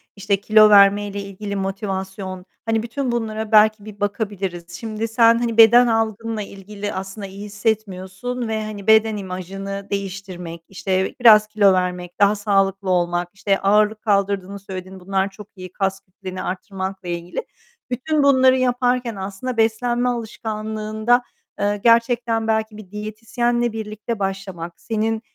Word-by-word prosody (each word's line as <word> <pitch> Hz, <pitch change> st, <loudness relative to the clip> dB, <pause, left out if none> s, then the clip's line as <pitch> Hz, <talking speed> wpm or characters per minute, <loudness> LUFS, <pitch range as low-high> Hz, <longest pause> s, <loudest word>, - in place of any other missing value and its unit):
işte, 200 Hz, 0 st, 0 dB
kilo 215 Hz, 0 st, +6 dB
vermeyle 200 Hz, 0 st, +5 dB
ilgili 200 Hz, +1 st, -6 dB
motivasyon, 190 Hz, -1 st, -4 dB, 0.2 s
hani, 225 Hz, -1 st, 0 dB
bütün 250 Hz, +2 st, -3 dB
bunlara 220 Hz, -2 st, -3 dB
belki 215 Hz, -1 st, +5 dB
bir 210 Hz, -2 st, -11 dB
bakabiliriz. 200 Hz, -4 st, -3 dB
Şimdi 220 Hz, 0 st, -3 dB
sen 230 Hz, 0 st, +5 dB
hani 230 Hz, -2 st, -2 dB
beden 235 Hz, +2 st, +8 dB
algınla 225 Hz, -1 st, -1 dB
ilgili 205 Hz, +1 st, -7 dB
aslında 195 Hz, +2 st, -6 dB
iyi 200 Hz, +2 st, -9 dB
hissetmiyorsun 210 Hz, +3 st, -3 dB
ve, 220 Hz, -1 st, -2 dB
hani, 210 Hz, -1 st, -8 dB
beden 220 Hz, -1 st, +5 dB
imajını 195 Hz, +1 st, -6 dB
değiştirmek, 185 Hz, -4 st, -5 dB
işte, 190 Hz, 0 st, -1 dB
biraz 215 Hz, -3 st, +8 dB
kilo 210 Hz, -2 st, +4 dB
vermek, 180 Hz, -1 st, -2 dB
daha 205 Hz, +1 st, +5 dB
sağlıklı 195 Hz, -2 st, 0 dB
olmak. 175 Hz, -1 st, +1 dB
İşte, 195 Hz, 0 st, 0 dB
ağırlık 210 Hz, +2 st, +2 dB
kaldırdığını 200 Hz, -1 st, 0 dB
söyledin, 190 Hz, -1 st, -8 dB
bunlar 190 Hz, +1 st, -1 dB
çok 200 Hz, +1 st, -12 dB
iyi; 185 Hz, -2 st, -9 dB
kas 195 Hz, 0 st, -1 dB
kütlenini 185 Hz, -1 st, -8 dB
arttırmakla 190 Hz, 0 st, -5 dB
ilgili. 175 Hz, -, -4 dB, 0.5 s
Bütün 285 Hz, +5 st, 0 dB
bunları 260 Hz, -2 st, +5 dB
yaparken 245 Hz, -2 st, +1 dB
aslında 195 Hz, +6 st, -5 dB
beslenme 240 Hz, +2 st, +1 dB
alışkanlığında, 220 Hz, 0 st, -1 dB, 0.4 s
eee, 205 Hz, +1 st, +1 dB
gerçekten 230 Hz, -1 st, +3 dB
belki 220 Hz, -1 st, -1 dB
bir 200 Hz, -4 st, -12 dB
diyetisyenle 225 Hz, +3 st, -1 dB
birlikte 220 Hz, 0 st, -5 dB
başlamak, 190 Hz, -3 st, -4 dB
senin, 220 Hz, 0 st, -1 dB
205 Hz, 135 wpm, -21 LUFS, 195-225 Hz, 0.5 s, beden